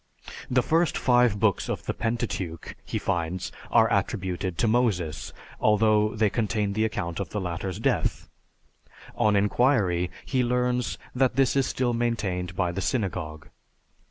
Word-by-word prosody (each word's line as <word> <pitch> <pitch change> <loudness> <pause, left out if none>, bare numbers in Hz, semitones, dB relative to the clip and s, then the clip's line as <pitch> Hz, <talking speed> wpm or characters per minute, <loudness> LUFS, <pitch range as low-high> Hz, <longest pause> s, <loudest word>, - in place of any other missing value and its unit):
The 125 -1 +3
first 165 0 +2
five 120 -4 +3
books 100 -4 +1
of - - -3
the - - -1
Pentateuch, 115 -8 -3
he - - -3
finds, 85 +1 -2 0.2
are 115 -1 +5
attributed 95 -3 -1
to 115 - +2
Moses, 100 -10 0 0.3
although 105 0 +3
they 110 -2 +2
contain 105 -2 0
the 110 +2 +1
account 95 -6 -3
of 100 - -3
the 105 - -3
latter's 90 0 -4
death. - - 0 0.9
On 105 -1 +3
inquiry, 100 -4 +2 0.2
he 130 -2 +1
learns 125 -4 0 0.2
that 130 -1 +2
this 135 0 +3
is 135 -1 +2
still 125 -2 0
maintained 100 -7 -1
by 90 -2 0
the 95 +3 -4
synagogue. 90 -7 -3
105 Hz, 145 wpm, -26 LUFS, 90-120 Hz, 0.9 s, are